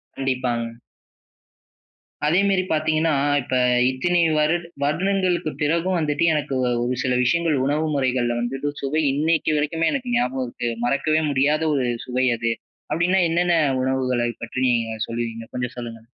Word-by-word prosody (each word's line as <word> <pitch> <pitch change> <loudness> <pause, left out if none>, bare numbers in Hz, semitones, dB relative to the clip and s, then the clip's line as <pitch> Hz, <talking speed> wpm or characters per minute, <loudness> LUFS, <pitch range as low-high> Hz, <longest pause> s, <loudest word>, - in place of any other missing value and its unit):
கண்டிப்பாங்க. 120 -3 -2 1.5
அதேமெரி 190 +3 +3
பார்த்தீங்கன்னா, 155 +1 +1 0.3
இப்ப 130 +1 -3 0.3
இத்தினி 175 +7 +1 0.2
வருட 155 +3 +2 0.2
வருடங்களுக்குப் 180 +1 0
பிறகும் 170 +5 +1
வந்துட்டு, 150 0 0
எனக்கு 145 -3 -2
வ - - +1 0.2
ஒரு 125 +1 -1
சில 130 -2 +1
விஷயங்கள் 165 +4 +2
உணவு 150 +3 0
முறைகள்ல 125 -3 0
வந்துட்டு 135 +4 -2
சுவை 145 +3 0
இன்னக்கி 155 +2 +1
வரைக்குமே, 160 +2 0
எனக்கு 250 -3 -3
ஞாபகம் 130 +1 -1
இருக்கு. 120 0 -4 0.2
மறக்கவே 155 +5 +1
முடியாத 145 +3 +2
ஒரு 130 -2 0 0.2
சுவை 130 +1 0
அது. 115 0 0 0.4
அப்பிடின்னா, 175 +5 +2
என்னென்ன 175 +1 +2 0.3
உணவுகளை 130 -2 0
பற்றி 115 +2 -4
நீங்க 115 -2 0
சொல்லுவீங்க. 115 -1 -4
கொஞ்சம் 125 -1 -4
சொல்லுங்க. 115 -2 -6
145 Hz, 135 wpm, -22 LUFS, 125-165 Hz, 1.5 s, அதேமெரி